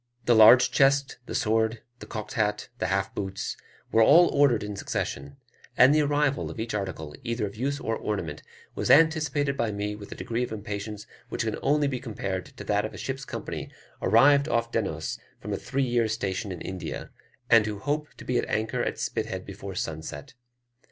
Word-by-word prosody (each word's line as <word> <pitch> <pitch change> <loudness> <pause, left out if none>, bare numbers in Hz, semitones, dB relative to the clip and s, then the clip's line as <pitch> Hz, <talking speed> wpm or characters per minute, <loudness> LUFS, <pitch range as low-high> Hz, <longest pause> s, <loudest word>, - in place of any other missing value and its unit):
The 120 - +5
large 110 +3 +8
chest, 135 -1 +3
the - - -5
sword, 110 0 +1 0.2
the - - -10
cocked 105 -2 -6
hat, 105 -2 -1
the - - 0
half 95 0 -1
boots, 95 -1 -4 0.4
were 115 - +4
all 165 +10 +7
ordered 140 -7 +3
in 105 0 -5
succession; 70 -7 -4 0.4
and 130 +3 +7
the 155 - +4
arrival 145 -1 +1
of - - -8
each 115 0 -3
article 95 -7 -4
either 115 -2 -1
of 100 0 -7
use 140 +5 -2
or 115 -5 -2
ornament 90 -10 -3 0.3
was - - -3
anticipated 150 -2 +4
by 115 -4 0
me 105 0 -3
with 105 -1 -11
a - - -6
degree 115 +1 -3
of 125 - -2
impatience 105 0 -5 0.2
which - - -2
can 110 -2 -2
only 145 +1 +2
be 130 -2 -2
compared 100 -7 -4
to - - -11
that 105 0 +1
of 110 - -5
a - - -8
ship's 135 0 -4
company - - -5 0.3
arrived 140 +8 +5
off 115 -2 0
Dennose 80 -10 -2 0.2
from 105 0 -5
a - - +1
three 135 +1 -1
years' 120 -3 +1
station 100 -1 -3
in 90 - -7
India, 95 -1 -6 0.4
and 115 -2 +5
who 105 -1 -3
hope 150 +8 -2
to - - -12
be 125 -1 +1
at - - -3
anchor 110 +1 -1
at - - -2
Spithead - - -3
before - - -8
sunset. 80 0 -5
110 Hz, 195 wpm, -27 LUFS, 100-135 Hz, 0.4 s, large